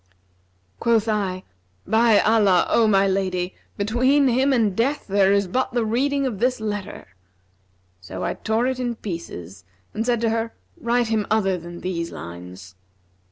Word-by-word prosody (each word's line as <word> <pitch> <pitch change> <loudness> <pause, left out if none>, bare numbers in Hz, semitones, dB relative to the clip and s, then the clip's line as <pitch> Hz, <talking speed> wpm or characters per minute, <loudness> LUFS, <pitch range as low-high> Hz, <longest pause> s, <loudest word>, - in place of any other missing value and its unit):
Quoth 230 -2 +2
I, 195 -4 -1 0.4
'By 225 -1 +4
Allah, 205 -5 +4
O 230 -1 +4
my 195 -2 +4
lady, 185 -2 -1 0.2
between 255 +7 +2
him 260 +3 +2
and 220 -7 +2
death 275 +7 0
there 195 -1 +3
is 200 -1 +2
but 255 +6 -1
the 240 -2 +1
reading 275 +5 0
of 230 -7 -3
this 250 +1 +1
letter!' 205 - -5 0.9
So 95 0 -7
I - - -1
tore 220 +2 -1
it 260 0 -1
in 240 -2 -2
pieces 105 - -7 0.3
and 220 - -2
said 240 -1 +1
to 230 -1 +1
her, 225 0 -2 0.2
'Write 235 0 0
him 220 -3 0
other 195 -3 +2
than 175 0 -9
these 170 -2 -3
lines.' 90 +2 -10
215 Hz, 160 wpm, -23 LUFS, 185-235 Hz, 0.9 s, By